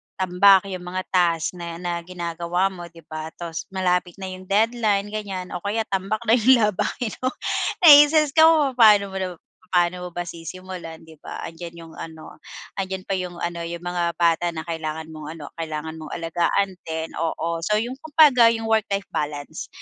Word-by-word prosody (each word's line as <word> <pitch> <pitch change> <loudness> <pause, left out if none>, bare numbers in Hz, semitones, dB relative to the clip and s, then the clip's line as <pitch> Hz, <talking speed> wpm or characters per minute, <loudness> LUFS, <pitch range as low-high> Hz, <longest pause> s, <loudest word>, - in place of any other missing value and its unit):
tambak 190 +1 +5
'yong 180 -1 -6
mga 185 +1 -3
task 170 -3 +2
na 170 -1 -6
na 175 0 -3
ginagawa 175 +1 -2
mo 175 -2 -9
'di 165 -1 -16
ba, 155 0 -5
tas 170 -2 -6
malapit 180 -1 0
na 190 -1 -6
yung 185 0 -10
deadline 210 -1 +1
ganyan 195 -4 -5
o 180 - -4
kaya 210 +4 -1
tambak 195 +3 -1
na 220 - +1
yung 240 0 +5
labahin 210 +3 -1
mo. 255 - -1 0.6
naistress 295 -1 +8
ka 320 +2 +7
kung 300 -4 +4
papano 210 -5 +5
mo 185 -2 -4 0.3
paano 180 0 +1
mo - - -8
ba 175 - -2
sisimulan, 170 0 -8
'di 160 -2 -16
ba, - - -8
'andiyan 170 +1 -8
yung 165 -1 -12
ano 160 -1 -10 0.4
'andiyan 190 -1 -3
pa - - -7
yung 180 -1 -5
ano 170 0 -4
yung 170 +1 -7
mga 175 -1 -1
bata 170 0 +2
na 160 - -4
kailangan 160 -1 -5
mong 155 -1 -9
ano 150 -3 -10
kailangan 160 0 -5
mong 155 - -8
alagaan 170 +4 0 0.2
din, 160 0 -4
oo. 165 0 -2
So 210 +6 0
yung 245 +5 -2
kumbaga 290 -6 +5
yung 225 -1 +1
work-life 220 -3 0
balance 145 -1 -4
180 Hz, 180 wpm, -23 LUFS, 165-205 Hz, 0.6 s, naistress